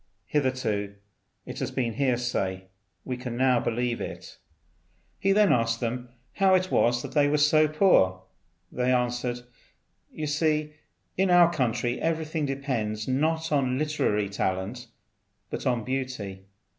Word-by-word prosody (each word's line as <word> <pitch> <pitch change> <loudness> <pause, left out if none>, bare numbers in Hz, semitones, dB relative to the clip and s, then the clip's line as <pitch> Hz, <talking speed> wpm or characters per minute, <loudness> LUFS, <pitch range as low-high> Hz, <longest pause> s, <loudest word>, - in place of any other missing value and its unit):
Hitherto 130 -8 -1 0.5
it - - -7
has - - -2
been 120 -3 -2
hearsay; 120 -7 -1 0.4
we 125 -1 -3
can 125 -2 -5
now 130 -1 +3
believe 120 +1 -1
it." - - -8 0.8
He 195 - +2
then 205 0 +5
asked 115 -1 +1
them 120 +1 -3 0.3
how 190 -1 +5
it 185 0 0
was 120 +1 +2
they 145 -2 +2
were 150 +1 +2
so 155 +1 +4
poor. 120 - +3 0.5
They 125 +1 0
answered, 125 0 0 0.7
"You 155 - -5
see, 150 0 0 0.4
in 190 0 +2
our 175 -1 +6
country 120 -4 -1
everything 160 -2 -1
depends, 120 -6 -3
not 160 +5 0
on 130 -3 +1
literary 135 -9 0
talent, 100 +5 -3 0.6
but - - -3
on 120 -3 +1
beauty. 125 -7 -4
130 Hz, 130 wpm, -27 LUFS, 115-150 Hz, 0.8 s, our